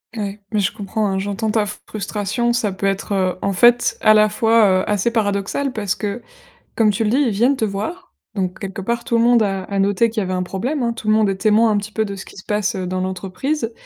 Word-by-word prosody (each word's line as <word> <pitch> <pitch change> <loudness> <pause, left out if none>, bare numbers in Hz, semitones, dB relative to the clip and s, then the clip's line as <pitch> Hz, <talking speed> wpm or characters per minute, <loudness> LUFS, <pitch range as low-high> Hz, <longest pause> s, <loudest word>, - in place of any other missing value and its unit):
Ouais, 205 -1 -4
mais 215 - +1
je 195 - +1
comprends 210 +1 -2
hein, 190 -1 -1
j'entends 205 +3 -2
ta 215 -1 +1
frustration, 210 +3 -3
ça 215 -4 0
peut 190 +1 -4
être 195 +1 -1
heu, 185 -2 +1
en 200 - 0
fait 240 +5 +4
à 215 - +6
la 215 0 +5
fois 215 -3 +3
heu, - - -3
assez 210 +2 +1
paradoxal 215 +4 -1
parce 205 -5 -2
que, 210 +3 -4 0.5
comme 225 -2 +3
tu 210 +2 0
le 210 - +1
dis, 255 - +2
ils 280 -4 +3
viennent 235 +7 +2
te 230 - -3
voir, 220 - -5 0.2
donc, 185 -3 -2
quelque 195 -1 -6
part, 235 +4 -2
tout 235 - +1
le 230 - +3
monde 240 -1 +5
a 195 -2 -2
a 200 -1 -3
noté 200 +4 +2
qu'il 225 - -3
y - - 0
avait 185 0 -3
un 180 - -1
problème 250 +11 -3
hein. 235 -1 0
Tout 225 - -9
le 215 - +4
monde 215 -2 +3
est 195 - 0
témoin 220 +2 +3
un 205 - +2
petit 205 +1 -4
peu 220 -1 0
de 200 -1 -5
ce 190 - -9
qui - - -14
se 190 - -10
passe, 210 +1 -1
heu, 185 -1 -3
dans 185 0 -2
l'entreprise, 195 +8 -3
210 Hz, 265 wpm, -20 LUFS, 195-230 Hz, 0.5 s, à